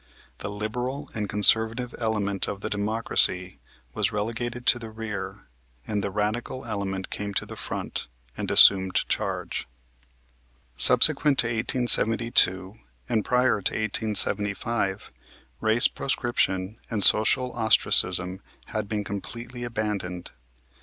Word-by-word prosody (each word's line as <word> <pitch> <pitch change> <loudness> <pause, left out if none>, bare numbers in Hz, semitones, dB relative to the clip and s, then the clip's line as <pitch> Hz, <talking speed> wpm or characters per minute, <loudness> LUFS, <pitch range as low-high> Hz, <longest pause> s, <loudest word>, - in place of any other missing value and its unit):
The - - -6
liberal 125 +7 -6
and 105 -2 -5
conservative 110 +4 +1
element 105 -4 -3
of 100 - -7
the - - -6
Democracy 100 -3 0 0.3
was - - -2
relegated 115 +3 -5
to 120 - +3
the 115 -1 -9
rear 110 -2 -8 0.4
and 105 -2 -4
the 100 - -3
radical 110 +5 -4
element 100 -4 -6
came 100 -1 -6
to - - -2
the - - -11
front - - -6 0.3
and - - -6
assumed 95 -1 +5
charge. - - -4 1.1
Subsequent 135 - +6
to - - +3
1872 115 -4 +1 0.3
and 110 - -1
prior 125 -3 0
to - - -3
1875 105 -1 -2 0.5
race 110 +5 +3
proscription 110 -6 -3
and 105 -3 0
social 125 +6 +8
ostracism 95 -5 +3 0.3
had 110 -3 -5
been 105 -1 -3
completely 115 +5 -8
abandoned. 105 -6 -5
110 Hz, 115 wpm, -24 LUFS, 100-120 Hz, 1.1 s, social